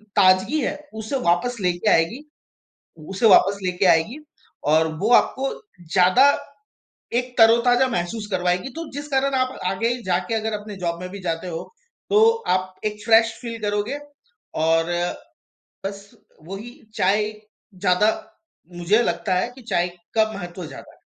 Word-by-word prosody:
ताज़गी 190 +10 +4
है 280 +4 -1 0.2
उसे 220 +4 -4
वापस 175 +9 +2
लेके 180 +3 +1
आएगी 165 +10 +2 0.9
उसे 195 +4 +1
वापस 200 -1 +5
लेके 180 +1 +1
आएगी 180 - +3 0.5
और 160 +1 +4
वो 210 +6 0
आपको 270 +2 +2 0.4
ज़्यादा 185 +8 +5 1.0
एक 250 0 -11
तरोताज़ा 235 +3 +5
महसूस 210 +1 -3
करवाएगी। 180 +4 0
तो 330 -1 -6
जिस 290 +1 -6
कारण 275 -1 +1
आप 255 0 -1
आगे 225 +6 0
जाकर 180 +4 0
अगर 220 0 -2
अपने 205 -1 -9
जॉब 170 0 -2
में 180 - -6
भी 200 +1 -8
जाते 165 0 -3
हो। 165 -2 -4 0.5
तो 425 +2 +6 0.3
आप 185 0 -5
एक 210 0 -4
फ्रेश 225 0 +5
फ़ील 230 -1 -5
करोगे, 210 +6 -1 0.6
और 165 +1 +2 1.0
बस 200 0 -6 0.4
वही 195 +5 -7 0.3
चाय 210 +3 +1 0.5
ज़्यादा 180 +4 +3 0.7
मुझे 180 +6 +2
लगता 190 -4 -1
है 180 - +1
कि 260 - -13
चाय 185 -6 0 0.3
का 220 -1 +3
महत्व 175 -1 -7
ज़्यादा - - -11
है। - - -26
205 Hz, 145 wpm, -22 LUFS, 180-235 Hz, 1.0 s, तो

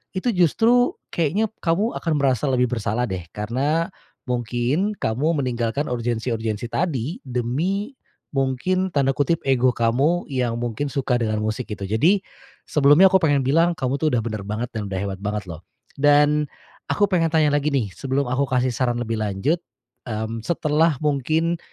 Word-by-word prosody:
Itu 190 +6 0
justru, 225 - +3 0.2
keknya, 185 +7 0
kamu 185 +8 +1
akan 165 - -1
merasa 135 0 +1
lebih 125 -2 +1
bersalah 115 0 -1
deh. 90 -3 -5
Karena, 135 +10 -1 0.3
mungkin, 125 - -1
kamu 140 - 0
meninggalkan 125 +3 -1
urgensi-urgensi 115 -1 -2
tadi, 160 - -2
demi, 150 - -1 0.4
mungkin, 145 +8 0
tanda 135 -1 +3
kutip, 145 +4 0
"ego" 130 -2 +2
kamu, 135 +10 +2
yang 125 -3 0
mungkin 120 +4 -2
suka 135 -3 0
dengan 110 -2 -1
musik 110 +3 -2
gitu. 105 -2 -6
Jadi, 155 - +2 0.5
sebelumnya 150 +6 +6
aku 190 - +5
pengen 145 -6 +2
bilang 165 +6 +3
kamu 135 -1 -2
tuh 160 - +1
udah 120 - +2
benar 110 -3 -5
banget 115 +4 -3
dan 105 -3 -4
udah 95 -1 -3
hebat 95 -1 -4
banget 105 0 -3
loh. 80 +2 -10 0.3
Dan, 145 +1 +4 0.4
aku 205 -1 +1
pengen 165 -3 +3
tanya 155 -2 +3
lagi 145 0 +1
nih, 110 -8 0
sebelum 135 +4 -1
aku 140 +2 +1
kasih 130 -1 +1
saran 120 0 0
lebih 115 -1 -2
lanjut. 110 - 0 0.5
Mmm, 110 0 -3
setelah 160 -1 +2
mungkin, 155 +4 +1
135 Hz, 155 wpm, -22 LUFS, 115-160 Hz, 0.5 s, sebelumnya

